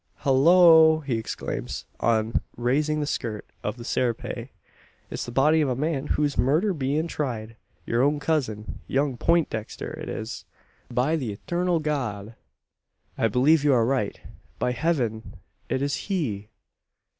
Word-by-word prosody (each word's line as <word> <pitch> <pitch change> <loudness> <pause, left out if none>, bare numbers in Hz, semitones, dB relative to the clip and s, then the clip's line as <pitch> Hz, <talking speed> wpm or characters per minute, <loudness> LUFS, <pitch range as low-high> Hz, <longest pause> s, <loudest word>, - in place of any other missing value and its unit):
"Hullo!" 160 +3 +6
he 135 -5 -2
exclaims, 65 - -5
on 110 -1 +1 0.2
raising 150 +6 +1
the - - 0
skirt 110 -6 -3 0.2
of 105 +3 -3
the 120 - -9
serape, 120 -2 -2 0.6
"it's - - -4
the - - -5
body 150 +5 +4
o' - - 0
the 130 - 0
man 145 +1 -1
whose 150 -2 0
murder's 165 +9 +2
bein' 145 +3 -1
tried 115 -8 -4 0.3
yur 115 +1 +1
own 145 +2 +2
cousin 125 -9 -2
young 135 -1 0
Peintdexter! 145 -7 -1
It - - -6
is, 110 +1 -6 0.4
by 125 +6 +1
the 125 -8 -3
Eturnal 175 - 0
God!" 115 -8 -3 0.8
"I 115 - +2
believe 140 +7 +3
you 145 -2 +4
are 115 -2 +3
right. 125 -5 -1 0.4
By 125 - 0
heaven 125 - -1 0.3
it 130 - 0
is 140 0 -1
he!" 115 - -3
135 Hz, 145 wpm, -25 LUFS, 115-155 Hz, 0.8 s, Hullo